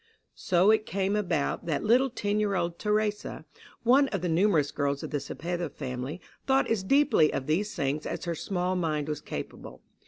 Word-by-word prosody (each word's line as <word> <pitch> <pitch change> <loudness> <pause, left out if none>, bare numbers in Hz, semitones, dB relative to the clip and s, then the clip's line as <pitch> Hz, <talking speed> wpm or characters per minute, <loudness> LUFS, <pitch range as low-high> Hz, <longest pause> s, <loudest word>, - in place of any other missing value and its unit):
So 185 +3 +3
it 220 0 +2
came 195 +1 0
about 175 -7 -1
that 150 -4 -1
little 250 +5 +4
ten 205 -2 -1
year 205 -2 +1
old 170 -1 -2
Theresa, 210 0 -1 0.4
one 265 +4 +5
of 195 -8 -3
the 180 - -1
numerous 160 -4 +3
girls 140 -1 -1
of - - -6
the 145 - 0
Cepeda 170 +3 -4
family, 130 +3 -5 0.3
thought 270 0 +3
as 225 -4 +2
deeply 230 - +4
of 135 - -3
these 185 +8 0
things 145 +2 -1
as - - -4
her 170 - -1
small 180 +2 -2
mind 155 -4 -1
was 150 -2 -3
capable. - - -8
180 Hz, 185 wpm, -28 LUFS, 150-210 Hz, 0.4 s, one